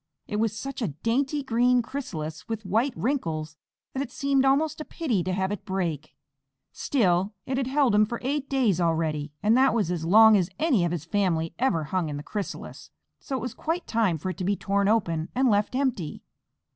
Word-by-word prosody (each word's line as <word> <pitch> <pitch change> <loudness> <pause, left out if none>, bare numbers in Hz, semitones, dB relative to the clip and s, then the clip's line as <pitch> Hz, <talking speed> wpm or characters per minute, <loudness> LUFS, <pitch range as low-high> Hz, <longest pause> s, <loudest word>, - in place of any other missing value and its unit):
It 210 - -3
was 220 0 0
such 270 +3 -5
a 225 - +1
dainty 260 - -1
green 245 0 +3
chrysalis 160 - -6
with 220 -2 -4
white 230 +7 +1
wrinkles, 165 - -2 0.4
that 265 - -2
it 280 - -4
seemed 275 -1 +1
almost 300 +3 +2
a - - -3
pity 250 - -1
to 185 - -2
have 190 +1 -1
it 205 - -4
break. 170 -8 -3 0.6
Still 195 -5 +1
it 260 0 -2
had 265 -2 0
held 270 -3 +2
him 210 0 +4
for 235 - -3
eight 280 +1 -2
days 235 -10 +2
already 160 -3 0
and 215 +2 +4
that 260 -2 +4
was 200 -7 +1
as 170 -3 -2
long 220 +5 +7
as 180 -4 +2
any 290 - +2
of 170 - -1
his 165 -3 -4
family 165 -4 0
ever 235 -11 +1
hung 175 +1 -1
in 145 - -4
the 145 - -6
chrysalis, 205 +4 -6 0.3
so 270 - -5
it - - -5
was 245 0 -4
quite 330 +2 -3
time 220 -7 +1
for 185 +5 -3
it - - -9
to 185 - -4
be 200 +3 +1
torn 200 0 0
open 170 -7 +1
and 260 -1 +3
left 205 +4 +1
empty. 250 - -2
210 Hz, 210 wpm, -26 LUFS, 175-260 Hz, 0.6 s, long